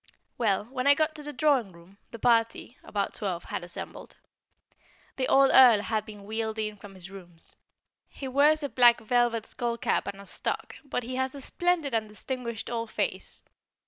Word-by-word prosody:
Well, 205 Hz, -4 st, +1 dB
when 255 Hz, +2 st, -3 dB
I 285 Hz, -, +7 dB
got 310 Hz, +1 st, +1 dB
to 305 Hz, -, -9 dB
the 295 Hz, 0 st, -6 dB
drawing 260 Hz, -8 st, +1 dB
room, 170 Hz, +4 st, -18 dB
the 230 Hz, -, -9 dB
party 230 Hz, +1 st, +1 dB
about 200 Hz, -1 st, -2 dB
twelve 180 Hz, -5 st, -3 dB
had -, -, -5 dB
assembled. 175 Hz, 0 st, -8 dB, 1.0 s
The 260 Hz, -, 0 dB
old 270 Hz, 0 st, +5 dB
Earl 240 Hz, -5 st, +8 dB
had 215 Hz, 0 st, -2 dB
been 210 Hz, -2 st, -10 dB
wheeled 220 Hz, +1 st, -3 dB
in 215 Hz, -1 st, -2 dB
from 195 Hz, -1 st, -12 dB
his 185 Hz, 0 st, -12 dB
rooms: 175 Hz, -4 st, -12 dB, 0.5 s
he 270 Hz, -, -7 dB
wears 295 Hz, +4 st, +3 dB
a 285 Hz, -, -2 dB
black 240 Hz, -2 st, +5 dB
velvet 235 Hz, 0 st, +1 dB
skull 235 Hz, -1 st, -3 dB
cap -, -, 0 dB
and 200 Hz, -, -5 dB
a 200 Hz, -, -11 dB
stock -, -, -3 dB
but 265 Hz, -3 st, -3 dB
he 255 Hz, +2 st, -5 dB
has 260 Hz, +1 st, -1 dB
a -, -, -7 dB
splendid 340 Hz, -2 st, 0 dB
and 220 Hz, -1 st, 0 dB
distinguished 235 Hz, 0 st, -5 dB
old 230 Hz, -1 st, -3 dB
face. -, -, -3 dB
230 Hz, 185 wpm, -28 LUFS, 210-265 Hz, 1.0 s, Earl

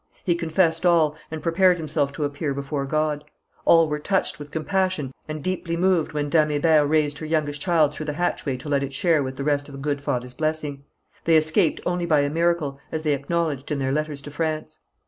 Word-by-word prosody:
He 175 Hz, -, +2 dB
confessed 165 Hz, 0 st, +1 dB
all, 165 Hz, -4 st, +4 dB
and 160 Hz, -1 st, -6 dB
prepared 180 Hz, +2 st, +4 dB
himself 150 Hz, -3 st, -1 dB
to 150 Hz, -, -3 dB
appear 145 Hz, 0 st, -2 dB
before 140 Hz, 0 st, -3 dB
God. 155 Hz, 0 st, 0 dB, 0.4 s
All 165 Hz, -1 st, +6 dB
were 150 Hz, 0 st, -2 dB
touched 190 Hz, +2 st, 0 dB
with 145 Hz, 0 st, -8 dB
compassion 165 Hz, -3 st, -1 dB
and 155 Hz, -1 st, -5 dB
deeply 170 Hz, -2 st, -2 dB
moved 180 Hz, -2 st, +2 dB
when 150 Hz, -1 st, -2 dB
Dame 155 Hz, 0 st, +3 dB
Hébert 150 Hz, 0 st, +3 dB
raised 150 Hz, -2 st, +1 dB
her 155 Hz, -, -5 dB
youngest 150 Hz, -2 st, -1 dB
child 160 Hz, -5 st, +3 dB
through 155 Hz, +1 st, -6 dB
the 150 Hz, -, -1 dB
hatchway 145 Hz, -5 st, -1 dB
to 130 Hz, -, -9 dB
let 140 Hz, -1 st, +1 dB
it 140 Hz, 0 st, -4 dB
share 165 Hz, 0 st, +2 dB
with 130 Hz, -1 st, -4 dB
the 140 Hz, -, -4 dB
rest 145 Hz, 0 st, 0 dB
the 135 Hz, -, -8 dB
good 145 Hz, 0 st, -2 dB
father's 125 Hz, -3 st, -3 dB
blessing. 155 Hz, -2 st, -3 dB, 0.4 s
They 165 Hz, -1 st, +5 dB
escaped 155 Hz, 0 st, +2 dB
only 175 Hz, -1 st, -1 dB
by 155 Hz, -3 st, +4 dB
a 145 Hz, 0 st, 0 dB
miracle, 165 Hz, -4 st, 0 dB
as 160 Hz, 0 st, -3 dB
they 150 Hz, -2 st, +2 dB
acknowledged 145 Hz, 0 st, -2 dB
in 150 Hz, -, 0 dB
their 135 Hz, -1 st, -1 dB
letters 150 Hz, -1 st, -2 dB
to 145 Hz, -, -8 dB
France. 155 Hz, 0 st, -3 dB
155 Hz, 210 wpm, -24 LUFS, 145-165 Hz, 0.4 s, All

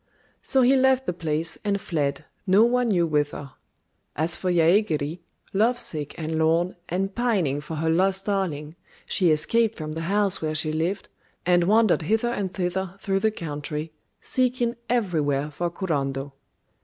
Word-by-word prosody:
So 265 Hz, -2 st, +2 dB
he 260 Hz, +2 st, +5 dB
left 265 Hz, 0 st, +3 dB
the -, -, -1 dB
place 165 Hz, -1 st, -2 dB
and 200 Hz, -1 st, 0 dB
fled, 145 Hz, -5 st, -2 dB, 0.2 s
no 195 Hz, +4 st, +6 dB
one 245 Hz, +1 st, +2 dB
knew 180 Hz, -6 st, +2 dB
whither. 145 Hz, -2 st, -1 dB, 0.6 s
As 160 Hz, +3 st, +2 dB
for 185 Hz, -, -1 dB
Yaégiri, 165 Hz, -2 st, +2 dB, 0.3 s
lovesick 200 Hz, -, 0 dB
and 160 Hz, 0 st, -2 dB
lorn, 165 Hz, +3 st, +2 dB
and 195 Hz, +3 st, -1 dB
pining 190 Hz, -, 0 dB
for 160 Hz, +2 st, -6 dB
her 160 Hz, +1 st, -1 dB
lost 190 Hz, +3 st, +2 dB
darling, 165 Hz, -7 st, -2 dB, 0.3 s
she 180 Hz, -3 st, +2 dB
escaped 220 Hz, +9 st, +2 dB
from 155 Hz, -1 st, -6 dB
the 160 Hz, +1 st, -4 dB
house 200 Hz, -1 st, +2 dB
where 155 Hz, -1 st, -2 dB
she 155 Hz, 0 st, +1 dB
lived, 170 Hz, +5 st, -2 dB, 0.4 s
and 175 Hz, -1 st, +4 dB
wandered 215 Hz, -1 st, +4 dB
hither 220 Hz, +8 st, +1 dB
and 200 Hz, -6 st, -2 dB
thither 185 Hz, 0 st, -2 dB
through 195 Hz, -1 st, 0 dB
the 220 Hz, -, +2 dB
country, 150 Hz, -4 st, -5 dB, 0.3 s
seeking 250 Hz, -2 st, 0 dB
everywhere 155 Hz, -, 0 dB
for 175 Hz, +4 st, -2 dB
Kurando. 140 Hz, -6 st, -3 dB
175 Hz, 155 wpm, -25 LUFS, 155-205 Hz, 0.6 s, no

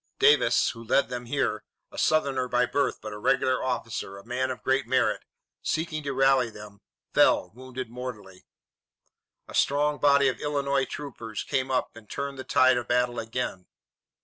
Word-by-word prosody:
Davis, 445 Hz, +1 st, +4 dB
who 115 Hz, -1 st, -10 dB
led 125 Hz, +4 st, +2 dB
them 125 Hz, -1 st, -5 dB
here, 135 Hz, -5 st, -1 dB, 0.3 s
a -, -, -12 dB
Southerner 140 Hz, -5 st, +2 dB
by 125 Hz, 0 st, +2 dB
birth, 140 Hz, +3 st, 0 dB
but 110 Hz, 0 st, -6 dB
a 105 Hz, -, -7 dB
regular 130 Hz, +2 st, +1 dB
officer, 115 Hz, -5 st, -3 dB
a 100 Hz, -, -13 dB
man 125 Hz, +2 st, -1 dB
of 130 Hz, -, -6 dB
great 130 Hz, -1 st, +1 dB
merit, 130 Hz, +1 st, +2 dB, 0.4 s
seeking 155 Hz, -1 st, -2 dB
to 140 Hz, -1 st, -3 dB
rally 135 Hz, -2 st, +3 dB
them, 105 Hz, -2 st, -12 dB, 0.3 s
fell, -, -, +4 dB
wounded 130 Hz, +1 st, -7 dB
mortally. 110 Hz, -6 st, -8 dB, 1.0 s
A -, -, -11 dB
strong 145 Hz, +1 st, +2 dB
body 140 Hz, -1 st, +5 dB
of 130 Hz, -, -1 dB
Illinois 140 Hz, -2 st, 0 dB
troops 115 Hz, -7 st, -6 dB
came 135 Hz, -2 st, -1 dB
up 130 Hz, -3 st, -1 dB
and 115 Hz, -2 st, -14 dB
turned 140 Hz, -1 st, -4 dB
the -, -, -4 dB
tide 130 Hz, -2 st, +4 dB
of 120 Hz, -, -3 dB
battle 125 Hz, 0 st, +1 dB
again. 115 Hz, -5 st, -4 dB
130 Hz, 170 wpm, -27 LUFS, 115-140 Hz, 1.0 s, body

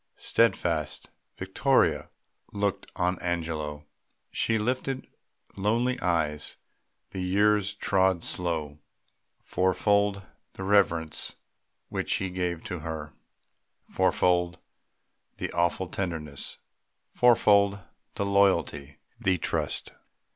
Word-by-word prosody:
Steadfast, 85 Hz, -9 st, +1 dB, 0.3 s
Vittoria -, -, +2 dB, 0.4 s
looked 100 Hz, -1 st, -2 dB
on 90 Hz, 0 st, 0 dB
Angelo. 80 Hz, -4 st, -3 dB, 0.5 s
She 115 Hz, -, +1 dB
lifted 130 Hz, +4 st, -2 dB, 0.5 s
lonely 120 Hz, +6 st, +1 dB
eyes. 80 Hz, -6 st, -1 dB, 0.5 s
The 95 Hz, -, -4 dB
years 100 Hz, +2 st, +2 dB
trod 95 Hz, -3 st, +2 dB
slow. 80 Hz, -4 st, -2 dB, 0.6 s
Fourfold 100 Hz, +2 st, +1 dB, 0.3 s
the 95 Hz, -, -7 dB
reverence 90 Hz, -5 st, +2 dB, 0.5 s
which -, -, -1 dB
he 95 Hz, -1 st, -2 dB
gave 90 Hz, -2 st, -2 dB
to 90 Hz, -, -4 dB
her, 80 Hz, -1 st, -6 dB, 0.7 s
Fourfold 90 Hz, 0 st, +1 dB, 0.8 s
the -, -, -3 dB
awful 85 Hz, +2 st, +1 dB
tenderness, 80 Hz, -7 st, -3 dB, 0.5 s
fourfold 100 Hz, -4 st, +5 dB, 0.4 s
The 100 Hz, -, -1 dB
loyalty, 95 Hz, -8 st, +2 dB, 0.2 s
the 95 Hz, -1 st, +2 dB
trust. -, -, -2 dB
90 Hz, 90 wpm, -27 LUFS, 80-100 Hz, 0.8 s, fourfold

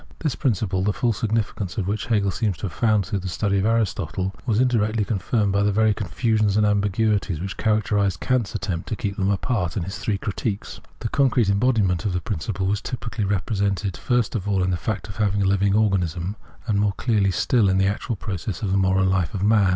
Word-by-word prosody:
This 150 Hz, -6 st, -1 dB
principle, 100 Hz, -8 st, 0 dB
the 105 Hz, +2 st, +1 dB
full 120 Hz, +2 st, +1 dB
significance 110 Hz, -2 st, -2 dB
of 100 Hz, -, 0 dB
which 105 Hz, +2 st, -2 dB
Hegel 105 Hz, -4 st, +2 dB
seems 105 Hz, -4 st, -1 dB
to -, -, -15 dB
have 90 Hz, -, -5 dB
found 110 Hz, -2 st, +2 dB
through 100 Hz, -, -2 dB
the 95 Hz, -, -5 dB
study 100 Hz, +2 st, 0 dB
of 100 Hz, -, +1 dB
Aristotle, 95 Hz, -4 st, 0 dB
was 110 Hz, -2 st, +2 dB
indirectly 115 Hz, -4 st, +2 dB
confirmed 100 Hz, +1 st, 0 dB
by 100 Hz, +1 st, +2 dB
the 105 Hz, 0 st, +2 dB
very 110 Hz, +1 st, +3 dB
confusions 105 Hz, +1 st, 0 dB
and 105 Hz, -, +4 dB
ambiguities 105 Hz, -3 st, +1 dB
which 95 Hz, +3 st, -4 dB
characterised 105 Hz, -4 st, +1 dB
Kant's 125 Hz, -2 st, 0 dB
attempt 95 Hz, -4 st, -3 dB
to -, -, -1 dB
keep 100 Hz, -1 st, -3 dB
them 100 Hz, -2 st, 0 dB
apart 100 Hz, -2 st, -1 dB
in 95 Hz, -, -1 dB
his 95 Hz, +3 st, -6 dB
three 105 Hz, -3 st, -1 dB
Critiques. 100 Hz, +1 st, -4 dB, 0.2 s
The 115 Hz, -, -2 dB
concrete 125 Hz, -6 st, +2 dB
embodiment 100 Hz, -5 st, +2 dB
of 95 Hz, -, -1 dB
the 90 Hz, -, 0 dB
principle 95 Hz, +1 st, -3 dB
was 100 Hz, +1 st, 0 dB
typically 115 Hz, -4 st, -4 dB
represented 100 Hz, -1 st, -1 dB
first 120 Hz, -3 st, 0 dB
of 105 Hz, -3 st, -3 dB
all 95 Hz, -2 st, +2 dB
in 90 Hz, -, +1 dB
the -, -, +1 dB
fact 100 Hz, +4 st, -3 dB
of 105 Hz, +1 st, -9 dB
a 105 Hz, -1 st, +3 dB
living 100 Hz, 0 st, +2 dB
organism, 95 Hz, -3 st, 0 dB, 0.3 s
and 105 Hz, -4 st, +1 dB
more 105 Hz, -1 st, +2 dB
clearly 105 Hz, -5 st, +1 dB
still 105 Hz, +2 st, +2 dB
in 95 Hz, -, +2 dB
the 95 Hz, -, +3 dB
actual 105 Hz, +4 st, -1 dB
process 95 Hz, 0 st, -5 dB
of 100 Hz, -, 0 dB
the 95 Hz, -, +2 dB
moral 95 Hz, 0 st, +3 dB
life 95 Hz, -3 st, 0 dB
of 95 Hz, -, -2 dB
man. 105 Hz, -2 st, +4 dB
100 Hz, 215 wpm, -23 LUFS, 95-110 Hz, 0.3 s, and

